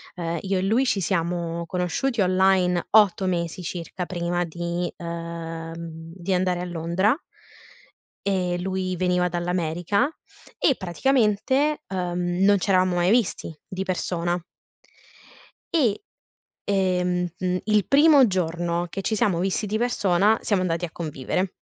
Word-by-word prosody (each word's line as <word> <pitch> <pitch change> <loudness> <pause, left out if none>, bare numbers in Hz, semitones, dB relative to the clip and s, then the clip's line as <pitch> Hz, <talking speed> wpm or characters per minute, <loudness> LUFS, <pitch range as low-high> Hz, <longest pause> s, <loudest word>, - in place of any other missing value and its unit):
ehm, 170 -1 -3
io 195 -1 -1
e - - -1
lui 225 +8 +2
ci 200 -5 +1
siamo 170 -1 -1
conosciuti 185 +8 -1
online 185 -1 +3
8 200 -3 +5
mesi 175 -1 -2
circa 175 +1 -5
prima 175 0 -1
di 170 +1 -3
ehm, 165 -1 -6 0.4
di 185 +1 -2
andare 180 -1 +1
a 180 - -3
Londra, 175 - +1 1.1
e 180 -2 0
lui 185 0 -2
veniva 180 0 +1
dall'America, 175 - 0 0.5
e 275 - +3
praticamente, 260 - +1
uhm, 180 0 -1
non 205 0 +5
c'eravamo 185 -1 +2
mai 175 +2 +2
visti 220 -8 0
di 190 0 -4
persona. 175 -2 -1 1.3
E, 255 - +2 0.6
ehm, 180 -2 +1
uhm, 185 0 0
il 210 -2 +2
primo 290 -1 +6
giorno 175 -1 -1
che 195 - -4
ci 220 - -1
siamo 190 -4 +1
visti 195 +3 0
di 215 +2 -1
persona 210 -3 +2
siamo 200 -4 +1
andati 175 -1 -1
a 165 - -10
convivere. 165 +4 -3
180 Hz, 130 wpm, -24 LUFS, 175-195 Hz, 1.3 s, primo